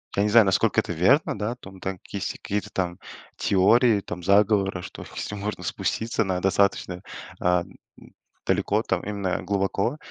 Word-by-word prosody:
я 100 - +2
не 105 - +1
знаю, 115 0 +7
насколько 95 -1 +2
это - - -5
верно, 105 - +3
да. 105 +4 -2
Там 95 -6 -13
там 95 -1 -4
если - - -6
есть 100 - -2
такие 105 - -3
какие-то - - -12
там 90 -2 -2 0.4
теории 110 +3 +4
там 90 -2 -7
заговора, 100 -1 +3
что - - -9
если 105 - -4
можно 105 +1 -4
спуститься 115 0 -1
на 95 -2 -1
достаточно, 95 -2 +1 0.4
а, 90 0 +3
м, - - -19 0.3
далеко, - - +1
там - - -1
именно 100 -3 -2
глубоко, 100 +6 0
100 Hz, 170 wpm, -25 LUFS, 95-105 Hz, 0.4 s, знаю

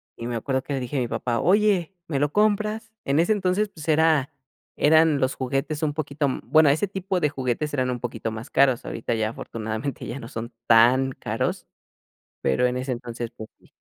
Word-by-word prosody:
y 115 - -7
me 120 - -3
acuerdo 130 +3 -1
que 140 - -4
le 135 - -1
dije 125 +2 -4
a - - +2
mi 120 - -1
papá: 115 +1 -1
"Oye, 195 -2 +2
¿me 145 -4 -1
lo 145 +1 +1
compras?". 215 +1 +1
En 140 +2 +2
ese 170 +5 +3
entonces, 200 +1 0
pues 160 -6 -11
era 155 -3 +3 0.4
eran 155 -1 +4
los 130 0 0
juguetes 135 +4 -2
un 150 -2 +1
poquito, 145 -1 -1
mm, 130 - -3
bueno, 155 +4 +5
ese 155 +9 +2
tipo 190 -1 -2
de 150 - +2
juguetes 135 +2 -2
eran 130 -2 0
un 125 - -3
poquito 115 -2 -4
más 110 +1 -7
caros, 130 -3 +3
ahorita 115 - -3
ya 110 -1 0
afortunadamente 110 +3 -5
ya 120 +4 -5
no 115 - -8
son 115 0 -6
tan 125 +4 +5
caros, - - -3 0.7
pero 70 - +2
en 125 0 -1
ese 130 +1 -3
entonces, 120 -1 -4
pues 110 -2 -10
sí. - - -25
135 Hz, 210 wpm, -24 LUFS, 120-160 Hz, 0.7 s, bueno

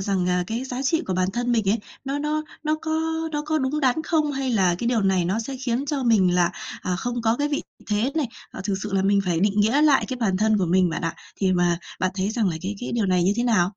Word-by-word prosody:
rằng, 190 -2 0
à, 180 0 +1
cái 230 +6 -3
giá 260 0 -4
trị 320 +4 +1
của 185 - -1
bản 185 0 +1
thân 245 +2 0
mình 220 -4 +1
ấy, 220 +4 +3 0.3
nó 275 +1 -2
nó 300 +1 -1 0.2
nó 310 0 +1
có 320 - -3 0.4
nó 295 0 -1
có 315 0 +1
đúng 280 +2 -1
đắn 270 +3 +2
không 310 -2 +1
hay 270 -1 -2
là 190 -6 +3
cái 235 - -2
điều 235 -2 +2
này 190 -2 +2
nó 190 +5 0
sẽ 260 +4 -4
khiến 255 +1 -2
cho 280 -1 -1
mình 200 -7 +4
là, 175 -1 +3 0.3
à, 180 -1 -1
không 240 +4 -3
có 225 +1 +2
cái 290 +2 0
vị 290 - -1 0.2
thế 215 +5 +1
này. 310 -4 +1 0.2
Ờ, - - -8
thực 200 - 0
sự 210 -2 -5
là 195 - +2
mình 200 +1 +3
phải 175 -3 0
định 205 +1 +2
nghĩa 230 +8 +3
lại 295 -3 +5
cái 260 - -3
bản 195 -4 +1
thân 215 +1 +2
của 185 - +1
mình 180 +1 +3
bạn 165 - -3
ạ. 165 -1 -1 0.2
Thì 190 -2 +1
mà 175 -1 +2 0.2
bạn 185 - +1
thấy 195 +1 -1
rằng 220 -3 +1
là 165 - -2
cái 195 +3 -3
cái 245 - -4
điều 225 -4 +1
này 180 -1 +2
như 185 +3 +3
thế 240 - +1
nào? 200 -7 +3
220 Hz, 290 wpm, -24 LUFS, 185-265 Hz, 0.4 s, lại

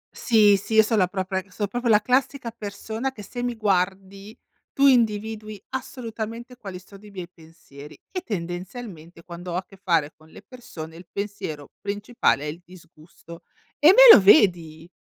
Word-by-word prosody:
Sì, 210 -3 +4
sì, 220 +3 -5
io 220 - +7
son 215 0 0
la 180 - +3
propria 190 0 -3
so' 205 +3 -3
proprio 240 +4 -3
la 210 -1 +6
classica 255 +1 -1
persona 220 +3 -5
che 215 -5 -11
se 245 +5 -7
mi 245 -1 -2
guardi 195 0 -2 0.3
tu 280 - +2
individui 215 -4 +1
assolutamente 235 -2 -7
quali 195 -6 -9
sono 195 +2 -16
i 210 - -13
miei 185 -3 -8
pensieri 160 -4 -15
e 365 - -4
tendenzialmente 175 - -7
quando 175 0 -8
ho - - -3
a 185 +1 -3
che - - -17
fare 170 -6 0
con 155 0 -21
le 195 - -15
persone 165 -9 -11
il 175 0 -14
pensiero 200 -8 -6
principale 205 - -1
è - - -5
il 155 +4 -6
disgusto, 170 -1 -16 0.4
e 295 - +5
me 475 +7 +10
lo - - +5
vedi! 175 - +3
200 Hz, 170 wpm, -23 LUFS, 175-225 Hz, 0.4 s, me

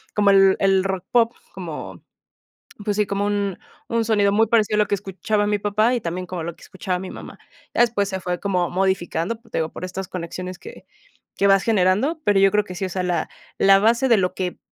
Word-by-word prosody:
como 205 -1 +4
el 195 -1 +5
el 195 -1 +3
rock 190 -2 -3
pop, 235 -1 +3 0.2
como, - - -7 0.8
pues 205 -1 0
sí, 210 - +2
como 200 +1 -2
un 200 -2 -1 0.3
un 230 -1 0
sonido 205 -3 +2
muy 225 +2 +3
parecido 215 -1 +2
a - - +2
lo 210 - +3
que 205 - +1
escuchaba 205 +2 -2
mi 210 -1 0
papá 215 +4 +1
y 235 - -2
también 180 +2 -4
como 175 -3 -5
lo 170 0 -5
que - - -19
escuchaba 185 -1 -4
mi 190 - -7
mamá, - - -10 0.4
ya - - +4
después 205 -4 +2
se 190 - -3
fue 180 -1 -3
como 180 -3 0
modificando, 190 +1 -1
por 225 - -23
eso - - -19
te - - -3
digo, 160 0 -2
por 185 - -6
estas 185 +1 -6
conexiones 180 +1 -6
que - - -12 0.5
que 200 - +3
vas 195 -1 +4
generando, 215 - +2
pero 205 -1 +3
yo 195 -1 +5
creo 210 0 +2
que 180 - -8
sí, 185 - -5
o - - -4
sea, 185 +1 -3
la 175 -3 -1 0.3
la 195 0 +6
base 235 +5 +3
de 230 - +6
lo 180 -1 0
que, 180 -1 -3
195 Hz, 235 wpm, -22 LUFS, 185-210 Hz, 0.8 s, la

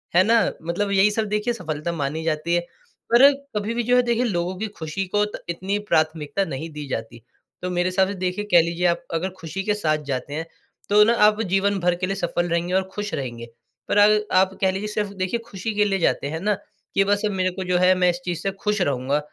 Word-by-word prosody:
है 185 - +7
ना? 230 +2 +4 0.2
मतलब 200 +5 -1
यही 195 +2 +4
सब 220 +1 -1
देखिए 210 +3 0
सफलता 160 -5 -4
मानी 155 0 -3
जाती 165 +1 -1
है, 175 - +2 0.5
पर 275 +4 +8 0.3
कभी 210 +3 -2
भी 240 - -1
जो 245 +2 +3
है 250 - +6
देखिए 240 0 +1
लोगों 180 -4 -1
की 220 +2 -3
खुशी 160 +5 -3
को 205 - +4
त 210 - -7
इतनी 190 +4 -2
प्राथमिकता 155 +3 +1
नहीं 160 +1 -5
दी 150 -1 -6
जाती। 115 -1 -5 0.4
तो 180 - -3
मेरे 180 0 0
हिसाब 190 +1 +2
से 200 - -3
देखिए 185 +3 -2
कह 175 - +8
लीजिए 170 +2 -2
आप 170 0 0
अगर 175 +3 -1
खुशी 165 +4 -5
के 210 - +1
साथ 155 -7 0
जाते 135 +2 -3
हैं, 160 +2 -3 0.4
तो 210 +1 +7
ना 230 +2 +4
आप 215 +1 +1
जीवन 195 +1 +1
भर 175 0 +2
के 185 +1 -2
लिए 195 - -2
सफल 175 -1 -1
रहेंगे 170 +2 -1
और 190 - +3
खुश 205 0 -4
रहेंगे, 120 -4 -4 0.4
पर - - 0
अर 210 +1 +6 0.2
आप 190 +1 +2
कह 190 -1 +3
लीजिए 195 +3 -4
सिर्फ 210 -1 -2
देखिए 185 +6 -1
खुशी 205 +1 -4
के 210 0 +3
लिए 195 -2 0
जाते 140 - +1
हैं 160 +2 -4
ना, 210 +4 +1 0.4
कि 195 - +5
बस 205 +1 +1
मेरे 185 -1 0
को 190 +1 -5
जो 180 -1 +1
है 185 +1 +5
मैं 180 -1 +4
इस 175 - -1
चीज़ 175 -2 -2
से 195 - -1
खुश 210 -2 0
रहूँगा, 140 -1 0
185 Hz, 240 wpm, -23 LUFS, 165-205 Hz, 0.5 s, पर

